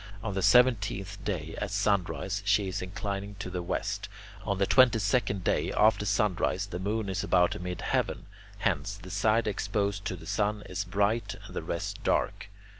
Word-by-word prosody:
On 105 - -2
the 95 - -1
seventeenth 105 -5 +3
day, 80 -6 -3
at - - -2
sunrise, 100 -1 0
she 105 -1 +2
is 95 - -3
inclining 100 +2 -4
to 95 -2 -6
the 90 -1 -3
west. 100 +3 -3 0.3
On 100 -2 -1
the 100 - +2
twenty 130 +1 +6
second 105 -2 0
day, - - +1
after 105 -1 +3
sunrise, 100 -2 +1
the 90 -3 -6
moon 105 +3 -1
is 95 +1 -2
about 90 -1 +2
mid 90 -1 -4
heaven; - - -1 0.3
hence, - - -1
the 90 +1 -10
side 110 +3 +2
exposed 100 -1 -1
to - - -2
the 85 - -12
sun 105 +1 0
is 95 +2 -3
bright 100 +5 0
and - - -11
the - - -2
rest - - -4
dark. - - 0
100 Hz, 180 wpm, -29 LUFS, 95-105 Hz, 0.3 s, twenty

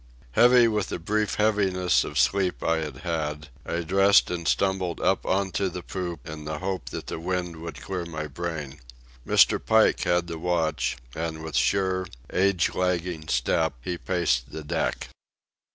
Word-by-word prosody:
Heavy 120 - +6
with 105 -3 0
the - - -3
brief 105 +5 -1
heaviness 100 -4 +2
of 75 - -5
sleep 95 +3 +2
I 80 0 +2
had 75 -4 -4
had, 75 -3 -3 0.2
I 85 - -1
dressed 95 +4 +4
and 85 -2 -3
stumbled 95 -3 0
up - - +1
on 95 0 +1
to 95 +2 0
the 90 0 -7
poop 90 -4 -5
in 75 -1 -7
the 75 0 -3
hope 95 -8 -4
that - - -6
the - - -5
wind 90 -1 -3
would 85 +1 -7
clear 90 -2 -4
my 80 -2 -5
brain. 75 -2 -5 0.5
Mr. - - +4
Pike - - +4
had 85 0 +2
the 85 -1 -6
watch, 85 -2 0 0.2
and 80 0 -4
with 80 -2 -6
sure, 95 -1 +1 0.3
age 95 -2 +2
lagging 90 -3 -1
step 80 +4 +1
he 90 - -2
paced 85 -9 0
the 80 - -6
deck. 75 - -2
85 Hz, 170 wpm, -26 LUFS, 80-95 Hz, 0.5 s, Heavy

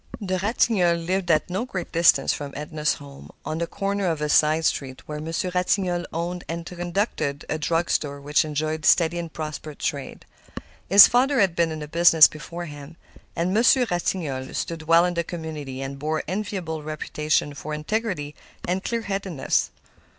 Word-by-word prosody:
The 185 -3 -2
Ratignolles 180 -5 +1
lived 185 0 -1
at 155 -2 +3
no 190 +5 -2
great 190 -8 -5
distance 170 0 +4
from 145 -1 -6
Edna's 150 +1 -1
home, 140 -1 -12 0.2
on 155 - -3
the 170 - -1
corner 200 +2 -2
of 165 -3 -1
a 150 0 -2
side 155 +2 +3
street, 130 -4 -2
where 150 0 -5
Monsieur 165 +3 -3
Ratignolle 180 -1 0
owned 175 +2 -3
and 165 0 -4
conducted 175 -5 -2
a 155 - -1
drug 165 +3 0
store 140 -1 -1
which 145 +1 +2
enjoyed 155 +1 -3
a - - +1
steady 170 0 +4
and 170 -2 -6
prosperous 155 -1 -6
trade. 140 -2 -4 0.6
His 200 +1 +10
father 260 +2 +2
had 190 -5 +3
been 170 -1 +1
in 155 -1 -5
the 150 - -6
business 165 0 +7
before 170 +3 -8
him, 145 +1 -10 0.4
and 175 +3 0
Monsieur 245 +4 +4
Ratignolle 155 -7 -2
stood 165 -2 -3
well 165 +1 +6
in 180 - -1
the 170 0 -1
community 155 -6 -6
and 135 0 -6
bore 155 +2 -1
an - - -3
enviable 185 -5 -3
reputation 150 -1 -1
for 145 +2 -7
integrity 155 -1 -2 0.3
and 185 +2 -1
clearheadedness. 195 - -1
165 Hz, 175 wpm, -24 LUFS, 150-180 Hz, 0.6 s, His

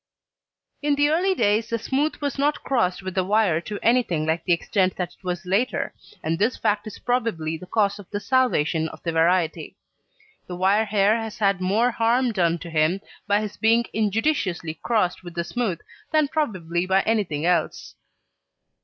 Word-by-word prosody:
In 295 -1 +2
the 290 +1 +3
early 370 +5 +2
days 215 - +1
the 230 - 0
smooth 275 +7 -1
was 285 -1 -2
not 295 +1 +1
crossed 195 -9 0
with 185 -1 -5
the 185 0 +1
wire 195 -4 +2
to 205 +4 -6
anything 230 -10 +2
like 160 +1 0
the 180 - -1
extent 185 +2 +1
that 180 -2 -3
it - - -24
was 180 0 -3
later, 200 +8 0 0.3
and 165 +2 -1
this 225 +5 +1
fact 210 +1 0
is 215 - -8
probably 220 -11 -1
the 180 +3 -10
cause 200 0 +1
of 200 - -12
the 205 - -3
salvation 185 - +1
of - - -13
the 170 - -1
variety. 165 0 +1 0.7
The 180 - -6
wire 195 +4 +2
hair 210 +1 +3
has 220 -1 -6
had 200 -3 +1
more 215 +7 +2
harm 235 +2 +2
done 175 -5 +1
to - - -7
him 160 +4 +2 0.3
by 205 +1 +2
his 210 -1 -6
being 230 +2 +3
injudiciously 210 - -1
crossed 210 -7 0
with 175 -1 -10
the 170 - -1
smooth 180 0 -2 0.3
than 310 -2 +2
probably 185 - -1
by 190 +1 +3
anything 185 -9 0
else. 170 -3 0
200 Hz, 180 wpm, -24 LUFS, 175-230 Hz, 0.7 s, the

